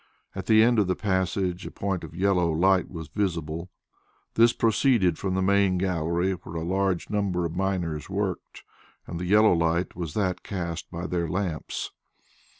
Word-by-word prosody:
At 95 Hz, -, -6 dB
the 110 Hz, -1 st, +6 dB
end 120 Hz, -1 st, +4 dB
of 100 Hz, -, +2 dB
the 90 Hz, -, +1 dB
passage 95 Hz, -2 st, -1 dB
a -, -, -5 dB
point 95 Hz, -3 st, -3 dB
of 80 Hz, -, -9 dB
yellow 90 Hz, -2 st, +2 dB
light 95 Hz, +3 st, +3 dB
was 80 Hz, -3 st, -7 dB
visible. 85 Hz, -1 st, -3 dB, 0.6 s
This 115 Hz, +1 st, +5 dB
proceeded 115 Hz, -, +2 dB
from 95 Hz, -1 st, -1 dB
the 95 Hz, -, +1 dB
main 100 Hz, -1 st, +3 dB
gallery 90 Hz, 0 st, 0 dB
where 85 Hz, -2 st, -7 dB
a 80 Hz, -, -2 dB
large 95 Hz, 0 st, 0 dB
number 95 Hz, -4 st, 0 dB
of 85 Hz, 0 st, -4 dB
miners 90 Hz, -5 st, -2 dB
worked, 95 Hz, -1 st, -3 dB, 0.4 s
and 85 Hz, -, -6 dB
the 90 Hz, -, -3 dB
yellow 105 Hz, +2 st, +5 dB
light 85 Hz, +1 st, 0 dB
was 85 Hz, -4 st, -5 dB
that 95 Hz, -4 st, 0 dB
cast 85 Hz, -4 st, -5 dB
by 85 Hz, +2 st, -5 dB
their 85 Hz, -2 st, -1 dB
lamps. 90 Hz, -3 st, -3 dB
90 Hz, 170 wpm, -26 LUFS, 85-100 Hz, 0.6 s, the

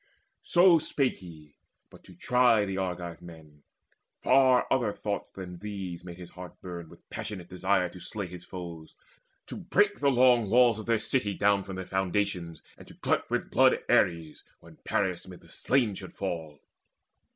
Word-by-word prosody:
So 175 Hz, -1 st, +5 dB
spake 135 Hz, -3 st, 0 dB
he 80 Hz, -5 st, -14 dB, 0.3 s
but -, -, -16 dB
to 90 Hz, -, -15 dB
try 120 Hz, +1 st, +3 dB
the 95 Hz, -1 st, -4 dB
Argive 90 Hz, -2 st, -4 dB
men. 80 Hz, -4 st, -14 dB, 0.6 s
Far 130 Hz, -1 st, +5 dB
other 120 Hz, -5 st, +2 dB
thoughts 100 Hz, 0 st, -4 dB
than 90 Hz, -2 st, -9 dB
these 95 Hz, -4 st, -6 dB
made 90 Hz, -1 st, -9 dB
his 90 Hz, -1 st, -11 dB
heart 90 Hz, 0 st, -11 dB
burn 85 Hz, -3 st, -8 dB
With -, -, -18 dB
passionate 95 Hz, -5 st, -6 dB
desire 90 Hz, 0 st, +1 dB
to 90 Hz, -, -12 dB
slay 100 Hz, +2 st, -4 dB
his 90 Hz, 0 st, -10 dB
foes, 85 Hz, -4 st, -9 dB, 0.5 s
To -, -, -8 dB
break -, -, +1 dB
the 140 Hz, -, +3 dB
long 125 Hz, -4 st, +4 dB
walls 120 Hz, -1 st, +5 dB
of 110 Hz, -, -8 dB
their 115 Hz, -1 st, +3 dB
city 105 Hz, -3 st, 0 dB
down 100 Hz, 0 st, +3 dB
From 95 Hz, -, -7 dB
their 95 Hz, 0 st, -5 dB
foundations, 95 Hz, -3 st, -2 dB, 0.2 s
and -, -, -13 dB
to -, -, -14 dB
glut -, -, -1 dB
with -, -, -2 dB
blood -, -, +5 dB
Ares, 85 Hz, -3 st, +1 dB, 0.2 s
when -, -, -16 dB
Paris 95 Hz, -3 st, -1 dB
mid 90 Hz, -1 st, -11 dB
the -, -, -19 dB
slain 125 Hz, -6 st, +1 dB
should 95 Hz, -1 st, -9 dB
fall. 80 Hz, -6 st, -5 dB
95 Hz, 175 wpm, -28 LUFS, 85-110 Hz, 0.6 s, So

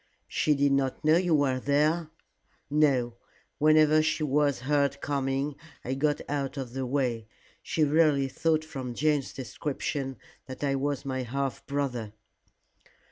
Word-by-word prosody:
"She 150 Hz, -, +1 dB
did 140 Hz, 0 st, +2 dB
not 135 Hz, +1 st, 0 dB
know 155 Hz, +2 st, +6 dB
you 175 Hz, -2 st, +2 dB
were 135 Hz, -3 st, +1 dB
there?" 150 Hz, +4 st, +1 dB, 0.6 s
"No. 130 Hz, -6 st, +2 dB, 0.4 s
Whenever 155 Hz, 0 st, +5 dB
she 155 Hz, 0 st, 0 dB
was 145 Hz, -2 st, +1 dB
heard 140 Hz, +1 st, +1 dB
coming 140 Hz, 0 st, -1 dB, 0.3 s
I 130 Hz, -, -1 dB
got 145 Hz, +2 st, 0 dB
out 140 Hz, -1 st, -3 dB
of 130 Hz, -3 st, -5 dB
the 130 Hz, -1 st, -3 dB
way. 125 Hz, -5 st, -1 dB, 0.3 s
She 160 Hz, -, 0 dB
really 150 Hz, -2 st, +3 dB
thought 155 Hz, +4 st, 0 dB
from 130 Hz, -6 st, -6 dB
Jane's 150 Hz, -1 st, +1 dB
description 135 Hz, +2 st, -4 dB, 0.3 s
that 130 Hz, +2 st, -7 dB
I 140 Hz, -1 st, +1 dB
was 140 Hz, 0 st, -2 dB
my 130 Hz, -1 st, -2 dB
half 135 Hz, +1 st, -3 dB
brother." 125 Hz, -7 st, -2 dB
140 Hz, 140 wpm, -28 LUFS, 130-150 Hz, 0.6 s, know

